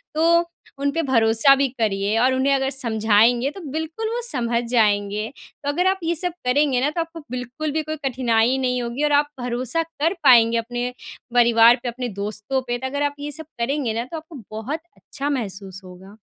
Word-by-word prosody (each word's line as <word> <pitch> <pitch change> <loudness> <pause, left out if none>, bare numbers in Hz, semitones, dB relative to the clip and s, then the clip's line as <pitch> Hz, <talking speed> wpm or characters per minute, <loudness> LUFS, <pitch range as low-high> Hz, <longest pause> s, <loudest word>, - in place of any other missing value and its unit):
तो 335 +2 +4 0.3
उन 280 0 0
पे 330 - -1
भरोसा 230 +1 +4
भी 275 0 +1
करिए 205 0 0
और 260 +2 +3
उन्हें 270 +2 +2
अगर 270 0 0
समझाएँगे 230 0 +2
तो 385 - -10
बिल्कुल 320 +8 -3
वो 485 - -2
समझ 235 -3 -1
जाएँगे। 210 -2 +1 0.4
तो 285 - -1
अगर 360 +6 +1
आप 380 0 +1
ये 335 +1 0
सब 355 +1 -1
करेंगे 260 0 +2
ना 285 - +2
तो 335 +3 -2
आपको 330 0 -7
बिल्कुल 250 +5 -4
भी 315 +1 -1
कोई - - -1
कठिनाई 245 0 +1
नहीं 250 -1 0
होगी 240 +5 -3
और 295 - +2
आप 290 0 +3
भरोसा 250 +6 -1
कर 325 +1 -1
पाएँगे 235 -3 +6
अपने 240 +2 -3 0.4
परिवार 235 -1 +6
पे, 245 - -1
अपने 245 +1 -4
दोस्तों 215 +6 -2
पे 240 - -1
तो 260 +2 -4
अगर 285 +2 -2
आप 285 0 -1
ये 295 +1 -5
सब 320 +1 -6
करेंगे 255 -1 -1
ना 230 +1 -2
तो 325 +5 -7
आपको 315 -7 -11
बहुत 220 +9 -4 0.2
अच्छा 285 +1 -5
महसूस 195 -7 -5
होगा। 185 +2 -13
255 Hz, 200 wpm, -22 LUFS, 230-295 Hz, 0.4 s, पाएँगे